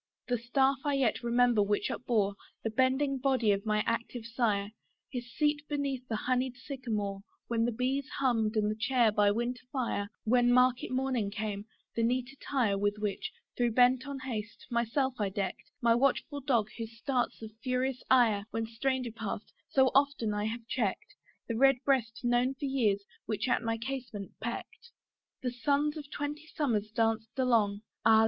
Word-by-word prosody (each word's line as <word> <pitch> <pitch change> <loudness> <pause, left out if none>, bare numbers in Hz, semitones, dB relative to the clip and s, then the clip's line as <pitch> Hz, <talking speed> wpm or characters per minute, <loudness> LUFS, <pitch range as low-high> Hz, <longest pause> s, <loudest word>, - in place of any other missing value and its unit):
The 245 -1 +1
staff 265 +3 +2
I 290 -1 +1
yet 260 -4 +1
remember 240 -2 +3
which 205 0 +1
upbore 215 -5 +1 0.3
The 225 - -1
bending 265 +3 +2
body 255 -5 +3
of 200 +2 -1
my 210 0 +2
active 230 0 -2
sire; 220 -4 0 0.4
His 245 -2 -5
seat 295 +1 +1
beneath 275 -3 -2
the 225 - -2
honeyed 255 +2 0
sycamore 220 -8 -3 0.3
When 230 -1 +2
the 240 - +1
bees 260 +4 -1
hummed, 230 -5 +1
and 215 0 +1
chair 245 -4 +4
by 205 -1 +4
winter 240 +3 -1
fire; 235 -6 -1
When 245 +2 +4
market 250 0 +4
morning 255 -5 0
came, 210 -1 -4 0.3
the 230 - +1
neat 245 +2 +1
attire 245 -8 0
With 205 +1 +1
which, 210 -2 -2 0.3
though 240 -1 +3
bent 250 +3 +4
on 280 -1 -4
haste, 225 -4 -5
myself 240 +3 +1
I 200 - +1
deck'd; 190 -1 -4
My 235 -1 +6
watchful 275 +3 +1
dog, 235 -6 +1
whose 225 0 -6
starts 250 +1 -1
of 220 - -7
furious 255 0 -1
ire, 225 -6 +4
When 225 0 -2
stranger 250 +2 -1
passed, 220 -2 -5 0.2
so 265 -1 +4
often 275 -6 +2
I 210 0 -1
have 225 +1 -4
check'd; 230 - -2 0.3
The 230 - -2
red 270 +2 +6
breast 235 -6 +1
known 245 +2 +2
for 280 - -4
years, 220 -7 +1 0.2
which 215 +3 -1
at 245 - +2
my 225 -1 -1
casement 240 -5 -5
peck'd. 235 - -6 0.5
The 250 - 0
suns 285 +4 +1
of 295 -2 -7
twenty 295 +2 -4
summers 225 -10 -1
danced 225 +2 0
along, 225 -6 +2 0.2
Ah! 220 -1 +7
240 Hz, 170 wpm, -31 LUFS, 220-265 Hz, 0.5 s, Ah